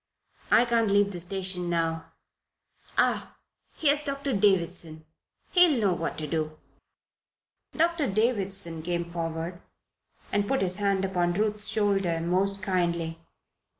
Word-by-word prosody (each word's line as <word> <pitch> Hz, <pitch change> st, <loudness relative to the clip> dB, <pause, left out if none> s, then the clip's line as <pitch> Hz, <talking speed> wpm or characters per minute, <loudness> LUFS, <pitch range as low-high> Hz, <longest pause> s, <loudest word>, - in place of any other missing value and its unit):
"I 235 Hz, -, +6 dB
can't 230 Hz, -2 st, +2 dB
leave 200 Hz, 0 st, +3 dB
the 180 Hz, -, -3 dB
station 185 Hz, 0 st, -2 dB
now 165 Hz, -1 st, -1 dB, 0.8 s
Ah! -, -, +1 dB, 0.4 s
here's 295 Hz, -1 st, +3 dB
Doctor 280 Hz, -2 st, -3 dB
Davison. 175 Hz, -6 st, +1 dB, 0.5 s
He'll 350 Hz, -8 st, +5 dB
know 200 Hz, -4 st, +2 dB
what 165 Hz, -1 st, -3 dB
to 155 Hz, -, -3 dB
do." 155 Hz, 0 st, -2 dB, 1.2 s
Doctor 330 Hz, -2 st, +2 dB
Davison 195 Hz, -6 st, -1 dB
came 170 Hz, 0 st, -3 dB
forward 165 Hz, +1 st, -4 dB, 0.7 s
and 205 Hz, 0 st, +1 dB
put 270 Hz, -1 st, +1 dB
his 185 Hz, 0 st, 0 dB
hand 200 Hz, -2 st, +1 dB
upon 175 Hz, -2 st, 0 dB
Ruth's 210 Hz, +2 st, 0 dB
shoulder 195 Hz, -5 st, +1 dB
most 190 Hz, +3 st, 0 dB
kindly. 170 Hz, -3 st, -1 dB
190 Hz, 120 wpm, -27 LUFS, 170-210 Hz, 1.2 s, I